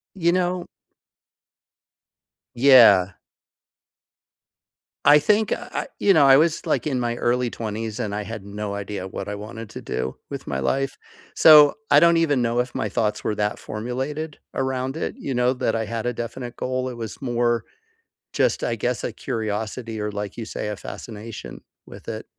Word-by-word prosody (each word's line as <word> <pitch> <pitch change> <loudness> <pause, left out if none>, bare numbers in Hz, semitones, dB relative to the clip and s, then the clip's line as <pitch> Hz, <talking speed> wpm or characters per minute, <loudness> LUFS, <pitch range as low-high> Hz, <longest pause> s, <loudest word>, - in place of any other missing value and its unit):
You 170 -2 +2
know 180 0 0 1.9
Yeah. 115 -8 +7 1.9
I 150 +1 +8
think 210 +6 +2
uh, - - -3
I - - -2
you 200 - +5
know, 155 -5 +6
I 135 0 +8
was, 160 +1 +1
like, - - 0
in 130 -4 0
my 120 -1 -1
early 125 0 +1
20s, 110 +1 -5
and 105 -3 -2
I 105 - -3
had 105 -1 -7
no 100 0 -5
idea 100 -1 -5
what 95 - -6
I 105 - -4
wanted 110 +2 -8
to - - -8
do 65 - -3
with - - -7
my 65 - -2
life, 135 - -1 0.4
so 150 -2 +8 0.2
I 145 - +8
don't 170 0 +5
even 145 -6 +2
know 120 0 0
if 125 0 -1
my 110 - -2
thoughts 105 +1 -1
were 105 - -1
that 105 0 -1
formulated 135 +8 -4 0.2
around 130 0 -2
it, 160 - -3
you 135 - -4
know, 125 0 +2
that 120 -3 -1
I 110 0 -1
had 115 +1 -4
a 125 - 0
definite 120 +1 -6
goal; 130 0 -2
it 125 - -7
was 110 -4 -7
more 120 -2 0 0.7
just, - - +1
I 115 - 0
guess, 120 +1 -2
a - - -2
curiosity 110 +1 -4
or, 105 0 -2
like 100 -1 -5
you 115 - -5
say, 105 - -5
a 105 - -3
fascination 110 +2 -9 0.2
with - - -13
it. - - -5
120 Hz, 175 wpm, -23 LUFS, 105-135 Hz, 1.9 s, I